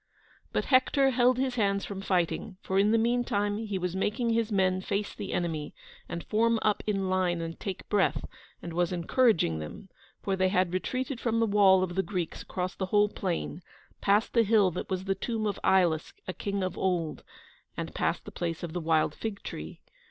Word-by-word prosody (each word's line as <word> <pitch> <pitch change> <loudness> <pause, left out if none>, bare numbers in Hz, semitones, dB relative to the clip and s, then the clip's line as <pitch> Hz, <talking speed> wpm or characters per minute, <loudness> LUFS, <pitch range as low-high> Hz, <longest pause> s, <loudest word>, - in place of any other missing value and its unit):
But - - 0
Hector 270 +1 +4
held 250 0 +3
his 260 -1 0
hands 200 -2 +1
from 195 -1 -6
fighting, 185 -1 -1
for 190 +1 +1
in 205 +1 +4
the 225 - +4
meantime 225 -3 +1
he 210 -3 -3
was 180 -1 -2
making 220 +5 0
his 230 -1 +1
men 185 -2 +2
face 200 +1 -2
the 200 -2 -6
enemy 160 -4 -2 0.3
and 170 - -4
form 230 +1 +2
up 210 -2 +2
in 195 -2 0
line 185 -2 +1
and 165 0 -5
take 190 -2 -5
breath, 205 -3 +1 0.4
and 170 - -6
was 175 +1 +1
encouraging 175 - +2
them, 80 - -8 0.3
for 195 - 0
they 185 0 +2
had 185 -2 +1
retreated 255 +7 -2
from 230 -1 +1
the 230 - +3
wall 200 -3 +5
of 180 -1 -3
the 190 - +1
Greeks 185 -4 -4
across 185 -1 -3
the 190 - -3
whole 205 +1 +3
plain, 180 -3 -3 0.4
past 205 +2 +2
the 235 - +5
hill 210 -3 +4
that 180 - -5
was 185 0 -2
the 195 - +1
tomb 220 +3 -3
of 205 -2 -2
Ilus, 175 -4 +2
a 185 - -3
king 200 0 -3
of 185 -1 -3
old, 175 -4 -1 0.5
and - - -4
past - - -1
the - - -8
place 170 -1 -3
of 165 -2 -5
the 175 - -2
wild 160 -2 +2
fig 215 +1 -5
tree. - - -7
195 Hz, 200 wpm, -29 LUFS, 180-215 Hz, 0.5 s, wall